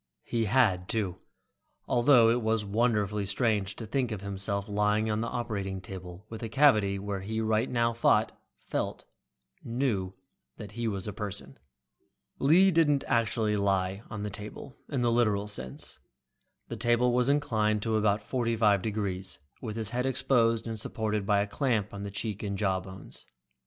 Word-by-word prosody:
He 115 -1 -1
had, 100 -6 +2
too, 100 -6 -2 0.7
although 120 -2 +5
it 120 +1 +1
was 110 -1 +1
wonderfully 105 -2 +1
strange 100 -1 0
to 115 - -7
think 125 +3 -1
of 105 -3 -4
himself 100 0 -2
lying 105 +1 +1
on 105 +1 0
the 115 - -2
operating 100 -6 -3
table 95 0 -9
with 110 -1 -8
a 115 - -4
cavity 110 -9 +4
where 100 0 -4
he 110 +3 -3
right 110 +2 +1
now 115 -1 +1
thought, 115 - +3 0.3
felt, - - -3 0.6
knew 115 -7 -1 0.4
that 105 -2 -8
he 120 +2 -3
was 100 -3 -3
a 105 - -4
person. 100 -8 -5 0.8
Lee 180 +8 +5
didn't 150 -4 +3
actually 110 -2 +1
lie 95 -1 0
on 105 -2 -5
the 105 - -3
table 105 +6 -8
in 140 -4 -1
the 120 -1 +2
literal 105 -4 +2
sense. 65 -11 -8 0.7
The 115 - -6
table 120 +2 +2
was 125 +1 +2
inclined 110 -8 +1
to 115 -1 0
about 105 -1 +2
forty 115 -1 -1
five 105 -3 +3
degrees, 100 -3 -3 0.2
with 110 -4 -5
his 110 -1 -1
head 125 +2 0
exposed 125 -3 +2
and 115 -1 -4
supported 105 -2 -2
by 100 -1 +3
a 100 - -1
clamp 110 -3 -1
on 100 - -6
the 100 - -4
cheek 100 +1 -3
and 100 -2 -3
jaw 95 -3 +1
bones. 95 -1 -11
110 Hz, 170 wpm, -29 LUFS, 100-120 Hz, 0.8 s, although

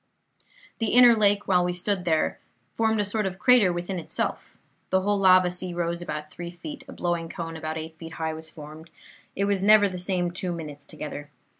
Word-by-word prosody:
"The 225 -2 -1
inner 245 -1 +8
lake, 205 -1 +2
while 180 -2 +3
we 180 0 -1
stood 185 +1 -2
there, 160 -2 +1 0.3
formed 220 -1 +1
a 205 - +1
sort 210 0 0
of 190 0 -6
crater 235 -4 +5
within 175 +2 -3
itself; 165 - -4 0.3
the 190 0 +2
whole 205 +1 +1
lava 185 -2 +5
sea 180 0 -3
rose 170 0 -2
about 150 -3 -6
three 175 0 -7
feet; 280 - -9
a - - -10
blowing 170 -2 -2
cone 165 -1 -6
about 155 0 -4
eight 160 0 -7
feet 165 0 -9
high 160 -1 -3
was 160 0 -6
formed; 155 +1 -11 0.5
it 200 - 0
was 200 -2 +1
never 210 +1 +6
the 185 -2 -6
same 180 -1 0
two 180 0 -3
minutes 150 -4 -8
together. 145 -1 -8
180 Hz, 200 wpm, -25 LUFS, 165-200 Hz, 0.5 s, inner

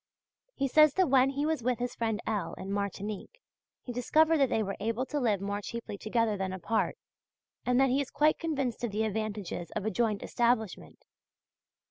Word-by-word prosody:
He 275 - 0
says 305 +1 +5
that 370 -7 +2
when 265 0 +5
he 280 +2 -1
was 315 -3 0
with 250 +1 0
his 245 0 -3
friend 225 -2 -1
L. 215 -2 -2
in 190 +1 -6
Martinique, 200 - -4 0.4
he 245 - -6
discovered 315 +7 +3
that 270 -2 +4
they 220 - +1
were 195 -1 -3
able 230 +4 -1
to 295 +2 -2
live 220 -7 +2
more 200 +1 -2
cheaply 230 0 -6
together 220 +1 0
than 190 -1 -2
apart, 190 +4 -1 0.7
and 250 0 +3
that 270 0 +4
he 270 +2 +2
is 275 - -5
quite 305 +1 +2
convinced 275 -8 -2
of 240 - 0
the 210 +2 -1
advantages 210 -5 -3
of 200 - -2
a 220 - 0
joint 220 -4 0
establishment. 235 -4 -1
230 Hz, 190 wpm, -30 LUFS, 210-270 Hz, 0.7 s, says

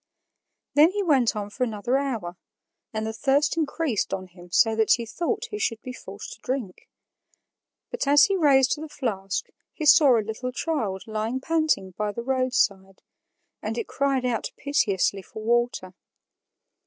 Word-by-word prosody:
Then 300 +3 +6
he 410 0 0
went 270 - +3
on 205 -1 -4
for 250 - -2
another 235 +2 -1
hour, 230 -11 -3 0.6
and 220 -1 -3
the 220 - -3
thirst 280 +7 +2
increased 310 -7 -1
on 185 -1 -7
him 175 -1 -16
so 225 +5 +3
that 220 -1 +4
he 235 - -1
thought 350 - -2
he 420 - -4
should 230 - -1
be 255 - -6
forced - - -9
to - - -15
drink. 250 -8 -5 1.0
But 485 -12 -3
as 290 +1 +7
he 395 - +3
raised 285 -4 +3
the 315 - -7
flask 195 -9 -3 0.3
he 310 - -5
saw 280 -5 +7
a 215 - -1
little 225 +4 -4
child 230 - -2
lying 220 +3 -2
panting 310 - 0
by 210 +2 -3
the 235 - -5
roadside, 240 -7 0 0.6
and - - -4
it 460 - -3
cried 275 -2 0
out 240 -3 -1
piteously 200 -8 +1
for 215 +3 -10
water. 235 -5 0
245 Hz, 165 wpm, -25 LUFS, 210-285 Hz, 1.0 s, as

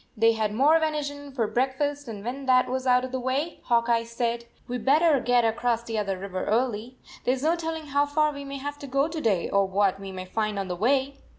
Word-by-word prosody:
They 225 +1 +5
had 220 -2 -1
more 285 +9 +4
venison 285 -2 -3
for 245 -4 0
break 260 +5 0
fast, 290 -1 -2
and 210 -2 -7
when 265 +3 -5
that 255 -1 +4
was 260 +1 -2
out 250 0 +4
of 255 - -8
the 260 - -2
way, 270 +6 -2
Hawk 235 -1 +2
Eye 230 -1 +2
said: 235 0 -2
" - - -34
We 245 0 -3
d - - -10
better 300 +1 +4
get 245 -1 +3
across 230 +1 0
the 225 -2 -3
other 195 -2 -2
river 185 -1 -4
early. 235 +2 -1 0.3
There 255 - +2
s 265 - -7
no 325 +2 +3
telling 325 -2 -4
how 285 0 +1
far 305 +1 +2
we 280 0 -7
may 275 0 -6
have 290 +1 -6
to 285 - -8
go 275 +2 +1
to 320 -1 -5
day, 195 - +1
or 200 0 +2
what 195 0 +1
we 195 -1 -7
may 185 -1 -6
find 215 +2 -2
on 195 -1 -3
the 180 - -2
way." 270 +7 +1
250 Hz, 260 wpm, -26 LUFS, 220-285 Hz, 0.3 s, They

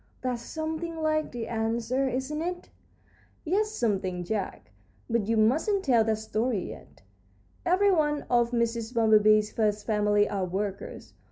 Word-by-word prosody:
"That's 250 -2 -2
something 320 +3 -4
like 310 -1 0
the 235 -2 -5
ants, 225 0 -1
sir, 260 +3 0
isn't 265 +4 -2
it?" 355 +1 -4 0.8
"Yes, 410 +6 +1
something, 190 - -1
Jack; 195 - -4 0.4
but 230 -3 0
you 225 0 +1
mustn't 315 - +2
tell 240 -5 +4
that 220 -1 +1
story 220 -1 -2
yet. - - -13 0.6
Every 390 +3 +4
one 295 -4 +1
of 240 -1 +2
Mrs. 235 0 -1
Bumblebee's 215 -1 +4
first 210 -2 0
family 210 -1 +2
are 195 -2 -2
workers. 195 +2 -5
235 Hz, 145 wpm, -27 LUFS, 215-300 Hz, 0.8 s, tell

